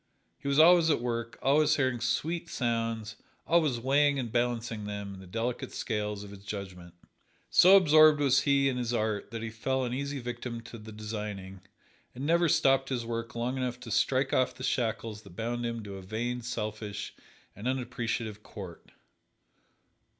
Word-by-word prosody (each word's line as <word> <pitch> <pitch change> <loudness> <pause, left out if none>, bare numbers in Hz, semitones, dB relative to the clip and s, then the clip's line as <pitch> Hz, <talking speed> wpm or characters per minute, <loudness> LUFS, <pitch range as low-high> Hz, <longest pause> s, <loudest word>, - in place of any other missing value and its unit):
He 140 - -7
was 140 0 +1
always 165 +1 +7
at 150 - +3
work, 115 -1 -3
always 150 +2 +4
hearing 130 -4 0
sweet 165 +8 -1
sounds, 115 -5 -2 0.3
always 155 -8 +2
weighing 140 +3 +3
and 120 -4 -3
balancing 120 -2 -1
them 100 -1 -5
in 95 - -10
the 95 - -12
delicate 115 +5 -3
scales 105 -2 -3
of 100 - -10
his 100 -1 -12
judgment. 95 -4 -7 0.6
So 190 +2 +8
absorbed 155 -4 +6
was 135 -2 +4
he 140 -1 +3
in 130 -2 0
his 120 -1 -1
art 110 -2 -1
that 115 -1 -5
he 110 - -4
fell 130 +4 -1
an 125 -1 -2
easy 140 +2 -3
victim 120 -1 -5
to 115 0 -10
the 110 +1 -10
designing, 105 -3 -6 0.5
and 130 +3 -5
never 170 +1 +3
stopped 135 -1 +3
his 125 -3 -2
work 115 0 -4
long 120 +3 -2
enough 125 -1 -2
to 120 -2 -8
strike 135 +5 +2
off 130 - +2
the 130 - -9
shackles 110 -4 -1
that 100 -4 -15
bound 120 +2 -2
him 115 -1 -4
to 100 -1 -7
a - - -8
vain, 115 +6 -3
selfish 105 -3 -4 0.4
and 105 +5 -5
unappreciative 120 -4 -2
court. 95 -6 -10
120 Hz, 175 wpm, -29 LUFS, 110-135 Hz, 0.6 s, So